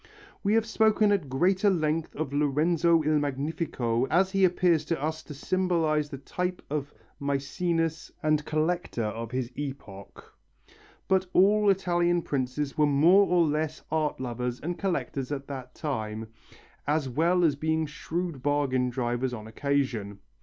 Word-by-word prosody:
We 205 Hz, +1 st, +2 dB
have 225 Hz, -1 st, +3 dB
spoken 220 Hz, -1 st, +3 dB
at 185 Hz, -9 st, 0 dB
greater 185 Hz, +9 st, +2 dB
length 160 Hz, -3 st, -1 dB
of 145 Hz, -2 st, -3 dB
Lorenzo 160 Hz, +3 st, +2 dB
il 155 Hz, 0 st, +2 dB
Magnifico 135 Hz, -4 st, -1 dB
as 190 Hz, +3 st, +2 dB
he 195 Hz, 0 st, +2 dB
appears 175 Hz, -3 st, +3 dB
to 165 Hz, -1 st, -1 dB
us 155 Hz, +2 st, -2 dB
to 150 Hz, -, -10 dB
symbolize 160 Hz, -3 st, 0 dB
the 140 Hz, -, -6 dB
type 180 Hz, +6 st, -4 dB
of 145 Hz, -1 st, -2 dB, 0.3 s
Mæcenas 160 Hz, +4 st, -1 dB
and 155 Hz, -1 st, +2 dB
collector 155 Hz, -4 st, -1 dB
of 110 Hz, +1 st, -4 dB
his 125 Hz, 0 st, -3 dB
epoch, 130 Hz, -9 st, -8 dB, 0.7 s
but 190 Hz, -1 st, +2 dB
all 205 Hz, +2 st, +5 dB
Italian 175 Hz, -2 st, +2 dB
princes 135 Hz, +1 st, -2 dB
were 150 Hz, -1 st, +3 dB
more 170 Hz, +8 st, +5 dB
or 175 Hz, -2 st, +3 dB
less 155 Hz, 0 st, -2 dB
art 155 Hz, -2 st, 0 dB
lovers 125 Hz, -1 st, -3 dB
and 175 Hz, +3 st, -4 dB
collectors 150 Hz, -8 st, -2 dB
at 140 Hz, -1 st, -3 dB
that 130 Hz, -2 st, -7 dB
time, 110 Hz, -6 st, -4 dB, 0.6 s
as 150 Hz, -1 st, +1 dB
well 170 Hz, +7 st, +2 dB
as 150 Hz, -4 st, +3 dB
being 160 Hz, +2 st, 0 dB
shrewd 160 Hz, 0 st, -4 dB
bargain 135 Hz, -3 st, +1 dB
drivers 120 Hz, 0 st, -2 dB
on 110 Hz, -2 st, -9 dB
occasion. 115 Hz, -4 st, -1 dB
150 Hz, 145 wpm, -27 LUFS, 135-175 Hz, 0.7 s, all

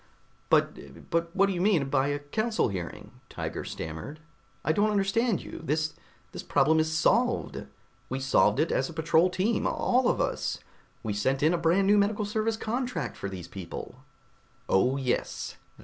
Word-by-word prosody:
"But -, -, 0 dB
but 170 Hz, 0 st, +1 dB
what 195 Hz, -, +5 dB
do 195 Hz, -, 0 dB
you 175 Hz, -, -2 dB
mean 180 Hz, -8 st, +3 dB
by 135 Hz, 0 st, +2 dB
a 145 Hz, 0 st, 0 dB
Council 215 Hz, -, -1 dB
hearing?" 90 Hz, -4 st, -7 dB
Tiger -, -, -4 dB
stammered. 80 Hz, -, -6 dB, 0.5 s
"I -, -, +3 dB
don't 205 Hz, +6 st, +2 dB
understand 205 Hz, +1 st, +1 dB
you! -, -, -8 dB
This 155 Hz, 0 st, 0 dB, 0.4 s
this -, -, -6 dB
problem 160 Hz, +1 st, +3 dB
is 155 Hz, 0 st, +1 dB
solved. 155 Hz, -, +1 dB, 0.4 s
We 130 Hz, -, -2 dB
solved 135 Hz, +1 st, +3 dB
it 160 Hz, -, +2 dB
as 135 Hz, -, 0 dB
a -, -, -8 dB
patrol 160 Hz, +2 st, +3 dB
team, 190 Hz, +5 st, 0 dB
all 250 Hz, 0 st, +2 dB
of -, -, +1 dB
us. -, -, -1 dB, 0.5 s
We 110 Hz, -, -2 dB
sent 130 Hz, +7 st, 0 dB
in 160 Hz, +3 st, +4 dB
a -, -, +2 dB
brand 180 Hz, +4 st, +3 dB
new 205 Hz, +1 st, +5 dB
medical 205 Hz, +1 st, +1 dB
service 220 Hz, +2 st, -1 dB
contract 245 Hz, +3 st, -3 dB
from 100 Hz, -, -5 dB
those 90 Hz, -3 st, -7 dB
people...." 85 Hz, -4 st, -8 dB, 0.6 s
"Oh, 125 Hz, +8 st, +3 dB
yes. 130 Hz, -3 st, -2 dB
160 Hz, 170 wpm, -28 LUFS, 135-205 Hz, 0.6 s, what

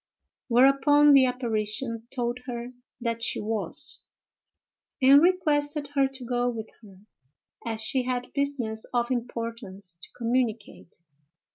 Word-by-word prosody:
Whereupon 275 Hz, +4 st, +5 dB
the 265 Hz, -2 st, +6 dB
apparition 230 Hz, -1 st, -3 dB
told 240 Hz, -1 st, -3 dB
her 240 Hz, -1 st, -5 dB, 0.3 s
that 230 Hz, -1 st, -3 dB
she -, -, 0 dB
was, 215 Hz, -, -1 dB, 1.0 s
and 275 Hz, +2 st, +7 dB
requested 300 Hz, -5 st, +1 dB
her 275 Hz, -1 st, +3 dB
to 265 Hz, -2 st, -8 dB
go 245 Hz, 0 st, 0 dB
with 225 Hz, -2 st, -6 dB
her, 195 Hz, -4 st, -16 dB, 0.7 s
as 225 Hz, -1 st, 0 dB
she 255 Hz, +4 st, +3 dB
had 250 Hz, 0 st, -4 dB
business 270 Hz, -6 st, -2 dB
of 240 Hz, +1 st, 0 dB
importance 230 Hz, -7 st, -5 dB
to -, -, -11 dB
communicate. 230 Hz, -6 st, -2 dB
245 Hz, 120 wpm, -26 LUFS, 225-270 Hz, 1.0 s, and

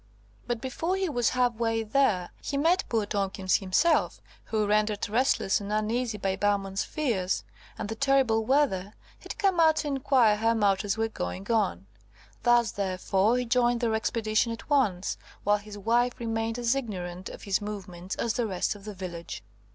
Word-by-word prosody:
But 240 Hz, -2 st, -2 dB
before 325 Hz, +8 st, -2 dB
he 385 Hz, -2 st, -1 dB
was 245 Hz, -5 st, +1 dB
half 250 Hz, -1 st, +1 dB
way 225 Hz, -1 st, 0 dB
there, 215 Hz, -6 st, +1 dB
he 280 Hz, -, -3 dB
met 335 Hz, +6 st, +3 dB
poor 225 Hz, -3 st, +1 dB
Tomkins 195 Hz, -2 st, 0 dB
himself, 205 Hz, -, +2 dB, 0.3 s
who, 215 Hz, -1 st, 0 dB
rendered 210 Hz, 0 st, +1 dB
restless 220 Hz, -3 st, +1 dB
and 200 Hz, +1 st, -6 dB
uneasy 220 Hz, +2 st, -1 dB
by 195 Hz, -1 st, -1 dB
Bowman's 195 Hz, -1 st, 0 dB
fears 215 Hz, -12 st, -1 dB, 0.3 s
and 215 Hz, -, -4 dB
the 220 Hz, -, -3 dB
terrible 260 Hz, -3 st, +2 dB
weather, 220 Hz, -7 st, +1 dB, 0.2 s
had -, -, -8 dB
come 385 Hz, -3 st, +2 dB
out 320 Hz, -1 st, +6 dB
to 310 Hz, -, -2 dB
inquire 260 Hz, -6 st, +3 dB
how 225 Hz, +2 st, +2 dB
matters 200 Hz, -1 st, +1 dB
were 225 Hz, 0 st, +1 dB
going 195 Hz, -, -5 dB
on. 150 Hz, -, 0 dB, 0.6 s
Thus, 240 Hz, -2 st, +4 dB
therefore, 195 Hz, +3 st, +1 dB
he 250 Hz, -, -1 dB
joined 240 Hz, 0 st, +2 dB
their 230 Hz, -2 st, +1 dB
expedition 220 Hz, 0 st, 0 dB
at 230 Hz, +5 st, -8 dB
once, 205 Hz, -10 st, +1 dB, 0.2 s
while 205 Hz, +1 st, +3 dB
his 210 Hz, 0 st, -10 dB
wife 240 Hz, +4 st, +1 dB
remained 225 Hz, 0 st, -2 dB
as 240 Hz, 0 st, +1 dB
ignorant 185 Hz, -8 st, -5 dB
of -, -, -10 dB
his 200 Hz, 0 st, 0 dB
movements 190 Hz, -3 st, -6 dB
as 230 Hz, -, -1 dB
the 240 Hz, -2 st, -1 dB
rest 185 Hz, -3 st, -1 dB
of 205 Hz, -1 st, -14 dB
the 210 Hz, -1 st, -7 dB
village. 175 Hz, -2 st, -7 dB
220 Hz, 175 wpm, -28 LUFS, 200-245 Hz, 0.6 s, out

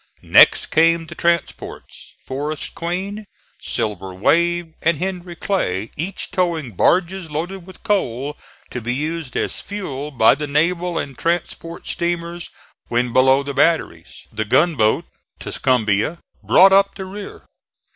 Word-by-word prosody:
Next -, -, +5 dB
came 165 Hz, +1 st, +3 dB
the -, -, -9 dB
transports 170 Hz, -1 st, -3 dB
Forest 145 Hz, +3 st, -4 dB
Queen, 195 Hz, +5 st, -4 dB, 0.3 s
Silver 95 Hz, -3 st, -3 dB
Wave 170 Hz, -, +1 dB
and 170 Hz, -1 st, +2 dB
Henry 180 Hz, 0 st, -4 dB
Clay, 110 Hz, -, -2 dB
each 180 Hz, +6 st, -4 dB
towing 170 Hz, -8 st, -1 dB
barges 180 Hz, -, +1 dB
loaded 175 Hz, +5 st, -5 dB
with 185 Hz, -, -14 dB
coal 145 Hz, -, -1 dB, 0.4 s
to 125 Hz, -, -4 dB
be 120 Hz, +2 st, -2 dB
used 155 Hz, 0 st, -3 dB
as -, -, -2 dB
fuel 150 Hz, -9 st, -5 dB
by 120 Hz, -6 st, +5 dB
the 150 Hz, -, -4 dB
naval 170 Hz, +4 st, 0 dB
and 135 Hz, -, -4 dB
transport 170 Hz, +1 st, -3 dB
steamers 170 Hz, 0 st, -3 dB, 0.4 s
when 120 Hz, 0 st, 0 dB
below 130 Hz, +1 st, +5 dB
the 140 Hz, 0 st, -5 dB
batteries. 135 Hz, -, 0 dB
The 110 Hz, -, -1 dB
gunboat 130 Hz, -2 st, +2 dB, 0.3 s
Tuscumbia 115 Hz, +3 st, 0 dB, 0.2 s
brought 190 Hz, +1 st, +6 dB
up 195 Hz, 0 st, +4 dB
the 190 Hz, -, -6 dB
rear. 200 Hz, +2 st, -9 dB
165 Hz, 130 wpm, -20 LUFS, 130-180 Hz, 0.4 s, brought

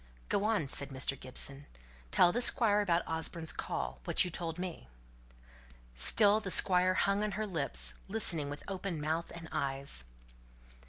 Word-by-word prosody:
"Go 205 Hz, +1 st, 0 dB
on," 215 Hz, -8 st, 0 dB
said 140 Hz, 0 st, 0 dB
Mr. 135 Hz, 0 st, -1 dB
Gibson. 135 Hz, +2 st, -2 dB, 0.4 s
"Tell 175 Hz, -, +4 dB
the 245 Hz, -, -1 dB
Squire 225 Hz, -4 st, +4 dB
about 175 Hz, -4 st, 0 dB
Osborne's 160 Hz, 0 st, -1 dB
call 60 Hz, 0 st, -5 dB
what -, -, +3 dB
you 180 Hz, -, -4 dB
told 165 Hz, -1 st, -4 dB
me!" 180 Hz, -, -7 dB, 1.1 s
Still 205 Hz, -, +6 dB
the 205 Hz, -3 st, -6 dB
Squire 185 Hz, 0 st, +4 dB
hung 200 Hz, +2 st, 0 dB
on 210 Hz, -1 st, -3 dB
her 215 Hz, +4 st, -3 dB
lips, 140 Hz, -, -2 dB
listening 175 Hz, -8 st, +1 dB
with 145 Hz, +1 st, -8 dB
open 190 Hz, -3 st, -5 dB
mouth 160 Hz, +3 st, -3 dB
and 165 Hz, -1 st, -10 dB
eyes. 135 Hz, -, -2 dB
170 Hz, 155 wpm, -31 LUFS, 140-200 Hz, 1.1 s, Still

